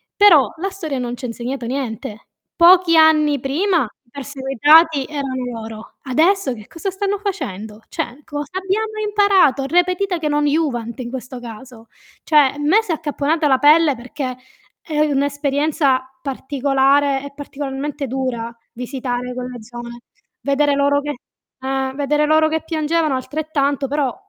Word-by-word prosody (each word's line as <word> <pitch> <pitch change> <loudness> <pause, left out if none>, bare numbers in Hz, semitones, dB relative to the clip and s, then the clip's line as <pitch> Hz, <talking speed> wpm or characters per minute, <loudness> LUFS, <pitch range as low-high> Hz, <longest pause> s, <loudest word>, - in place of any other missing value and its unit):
Però 355 -10 +6
la 390 - -1
storia 320 -8 -5
non 245 -1 -3
ci 250 - -8
ha - - -2
insegnato 240 +2 -5
niente. 240 -3 -5 0.3
Pochi 350 0 +6
anni 305 -3 +5
prima 325 +5 +1 0.2
i 235 - -34
perseguitati 280 +3 +3
erano 275 -4 -4
loro. 220 -1 -8
Adesso 310 +2 +2
che 215 -3 -11
cosa 335 +4 -5
stanno 395 +1 -2
facendo? 220 - -5
Cioè, 265 +5 -5
cosa 290 -1 -6
abbiamo 430 +3 -2
imparato? 395 -10 +3
Repetita 355 +4 +1
che 310 -2 -2
non 295 0 +1
iuvant 265 -6 -1
in 240 -1 -6
questo 255 0 -7
caso. 235 0 -11 0.4
Cioè 310 - -2
a 280 -2 +5
me 310 +9 +3
si 415 - -5
è 325 - +2
accapponata 305 +1 -1
la 265 -2 +3
pelle, 300 -1 +5
perché 255 +1 -5 0.5
è 305 -2 -3
un'esperienza 285 -1 +1 0.2
particolare 275 0 +1
e 280 - -8
particolarmente 285 0 -5
dura 250 -3 -3 0.2
visitare 250 0 -4
quella 250 0 -5
zona, 240 +1 -9 0.5
vedere 285 +1 +2
loro 285 0 +2
che 295 0 -3 0.5
eh, 265 0 -2
vedere 295 +1 +1
loro 315 +1 +4
che 320 0 -2
piangevano 315 -2 0
altrettanto, 285 0 -1
però 280 -2 -1
285 Hz, 145 wpm, -19 LUFS, 260-315 Hz, 0.5 s, Però